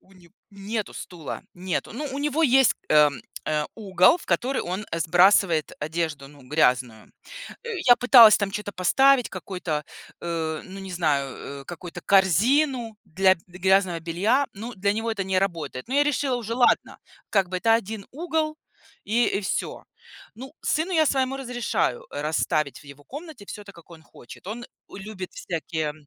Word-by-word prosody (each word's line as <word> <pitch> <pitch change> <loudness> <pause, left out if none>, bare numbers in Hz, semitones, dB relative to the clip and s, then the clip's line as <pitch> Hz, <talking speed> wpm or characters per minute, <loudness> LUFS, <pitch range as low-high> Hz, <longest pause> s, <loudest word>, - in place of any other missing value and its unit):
У 195 - -24
не 175 -2 -20 0.2
нету 205 +2 -5
стула, 170 -5 -7
нету. 180 -1 -3
Ну, 290 +6 -4
у 275 - -4
него 295 +2 0
есть, 265 -2 +5
эм, 150 -4 +4 0.2
э, 150 -1 0
угол, 190 - +4
в - - -14
который 260 +2 0
он, 185 +4 -4
э, 165 - -2
сбрасывает 175 -1 +4
одежду, 155 -2 -3
ну, 145 -1 -17
грязную. 125 -6 +1 0.5
Э, 470 - -7 0.2
я 245 -1 +8
пыталась 240 -3 +8
там 205 -2 -2
чё-то 205 0 -5
поставить, 250 +7 +3
какой-то, 180 -5 -4 0.4
э, 160 -2 -3
ну, 195 +1 -9
не 190 -1 -8
знаю, 145 -6 0 0.3
э, - - -20
какую-то 175 +2 -8
корзину 225 - +2
для 190 +3 +3
д 170 - -22 0.2
грязного 190 -2 +2
белья. 200 - +1
Ну, 225 +4 -7
для 200 +1 0
него 225 +2 -2
это 200 -4 -2
не 190 -1 +1
работает. 165 - -3
Но 260 - -3
я 290 +1 +4
решила 280 -3 0
уже: 230 -1 -4
ладно 245 0 +2 0.3
как 195 -3 +2
бы 185 - -2
это 225 +4 +3
1 220 -2 -3
угол 315 0 -2 0.5
и 235 +3 +2
и - - -1
всё. 190 - -3 0.5
Ну, 260 +5 -10
сыну 320 +4 0
я 315 -3 +3
своему 265 -1 0
разрешаю 240 - -2
расставить 150 0 -1
в - - -19
его 140 +1 -15
комнате 290 - -10
всё 210 - -8
так, 200 -1 -13
как 170 0 -17
он 165 -2 -13
хочет. 125 - -15
Он 230 +4 -6 0.3
любит 195 -2 -8
всякие 160 -2 -4
195 Hz, 170 wpm, -24 LUFS, 165-240 Hz, 0.5 s, я